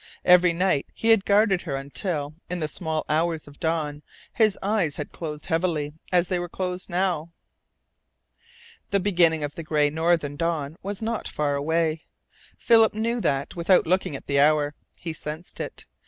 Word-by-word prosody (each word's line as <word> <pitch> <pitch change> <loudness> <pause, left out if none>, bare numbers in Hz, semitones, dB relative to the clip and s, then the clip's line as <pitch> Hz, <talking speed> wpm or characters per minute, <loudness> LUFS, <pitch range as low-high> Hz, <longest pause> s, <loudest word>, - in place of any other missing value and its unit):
Every 180 -1 +6
night 175 -4 +1
he 225 - -1
had 225 -3 +5
guarded 200 -2 +3
her 145 -6 -4
until, 145 +2 -3 0.2
in 180 0 -2
the 155 - -1
small 160 -1 -3
hours 160 0 0
of 145 0 -15
dawn, 155 -3 -1 0.3
his 215 -4 +3
eyes 195 -8 +1
had 150 - -6
closed 150 -3 -6
heavily 160 -3 -1 0.2
as 180 -1 +3
they 180 -1 0
were 175 0 -4
closed 180 +1 -4
now. 175 -3 -1 1.6
The 200 - +2
beginning 175 -5 +3
of 145 0 -3
the 165 - -6
gray 150 -2 +1
northern 160 -2 0
dawn 160 -3 -2
was 200 +2 -5
not 225 0 -2
far 145 -1 -1
away. 160 +2 0 0.5
Philip 225 -2 +4
knew 230 +2 -1
that 140 -3 -1
without 175 +2 +3
looking 180 -3 0
at - - -8
the 140 -1 +1
hour. 145 0 +3 0.2
He 165 -2 -6
sensed 155 +2 -8
it. - - -6
165 Hz, 170 wpm, -25 LUFS, 150-185 Hz, 1.6 s, Every